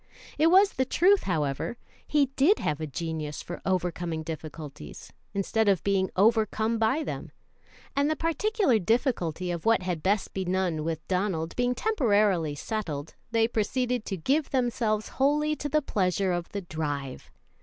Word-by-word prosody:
It 315 - +5
was 385 +4 +6
the 260 - +1
truth, 375 +9 +3
however. 155 - -1 0.3
He 295 -2 +3
did 345 +11 +4
have 150 0 -2
a 155 - -2
genius 155 0 -4
for 175 - -7
overcoming 175 -3 -1
difficulties, 155 - -8 0.2
instead 210 +2 +1
of 195 -3 +2
being 195 -1 +1
overcome 220 +2 +2
by 260 +8 +2
them; - - -5 0.6
and 285 +2 +2
the 310 - +1
particular 330 - +1
difficulty 185 - 0
of 170 -2 -4
what 225 -4 +3
had 180 -3 -2
best 200 +3 0
be 190 - -2
none 180 -4 0
with 160 0 -4
Donald 180 -4 -1
being 245 0 +1
temporarily 205 - +2
settled, 160 -5 -4 0.2
they 225 -1 +3
proceeded 245 +2 -1
to 195 - -3
give 275 - +1
themselves 235 -4 0
wholly 300 +3 +1
to 290 - -4
the 305 +1 +2
pleasure 190 -4 0
of 175 -1 -2
the 200 - -4
drive. 145 -6 -4
200 Hz, 155 wpm, -27 LUFS, 170-255 Hz, 0.6 s, was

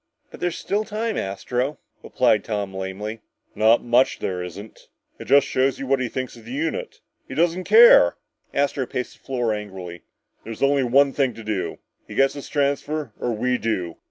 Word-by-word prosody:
"But - - -11
there's 175 -1 -2
still 205 +2 -1
time, 220 +1 -3
Astro," 125 +8 -2 0.2
replied 105 - +2
Tom 100 -3 -3
lamely. 95 +4 -5 0.3
"Not 110 +3 +4
much 120 +2 +3
there 90 -2 -3
isn't. 95 +5 -9 0.3
It - - -8
just 140 0 +5
shows 130 0 +1
you 135 - -5
what 135 0 +1
he 125 -2 -2
thinks 130 0 -5
of 115 - -14
the 115 - -10
unit! 155 +3 -3 0.3
He 130 - -7
just 170 +4 +4
doesn't 180 +2 -6
care!" 215 - +7 0.4
Astro 140 -2 0
paced 125 -1 -5
the - - -36
floor 120 -4 -1
angrily. 95 -5 -7 0.4
"There's 115 +4 -6
only 140 0 +3
one 135 +3 +4
thing 130 -5 0
to 115 - -9
do! 105 -3 -3 0.3
He - - -9
gets 135 0 +3
his 140 - -8
transfer 145 -2 -1
or 120 - -1
we 125 +3 0
do! 90 -7 -2
125 Hz, 185 wpm, -23 LUFS, 105-140 Hz, 0.4 s, care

